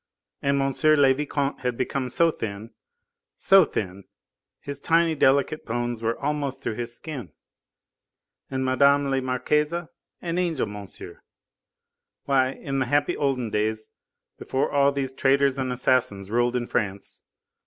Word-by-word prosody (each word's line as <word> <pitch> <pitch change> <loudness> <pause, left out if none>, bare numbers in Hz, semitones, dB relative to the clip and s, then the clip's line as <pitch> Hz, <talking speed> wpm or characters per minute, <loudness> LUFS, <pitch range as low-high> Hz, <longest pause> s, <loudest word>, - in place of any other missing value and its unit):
and 140 0 +1
M. 135 0 0
le 145 -3 +6
Vicomte 140 0 -2
had 125 -2 -2
become 130 0 -2
so 165 +6 +3
thin, 110 -3 -6 0.7
so 195 -1 +6
thin, 100 - -4 0.5
his 140 0 -6
tiny, 165 +2 +2
delicate 140 +1 +2
bones 120 0 -3
were 115 0 -1
almost 145 -1 -2
through - - -2
his 120 +1 -5
skin. 140 - -7 1.2
And 130 -1 -2
Mme. 140 +2 +4
la 135 0 +1
Marquise! 140 +4 0 0.5
an 170 0 -1
angel, 170 -8 0
monsieur! 105 -2 -10 1.0
Why, 130 -2 +2
in 135 0 -4
the 130 - 0
happy 145 +2 +1
olden 130 -5 -1
days, 110 +1 -2 0.5
before 130 - -1
all 140 0 +4
these 135 -2 -3
traitors 135 0 +2
and 130 -1 -1
assassins 120 -6 0
ruled 120 +1 +1
in 120 -1 -1
France, 100 -4 -3
M. - - -54
130 Hz, 145 wpm, -25 LUFS, 120-140 Hz, 1.2 s, le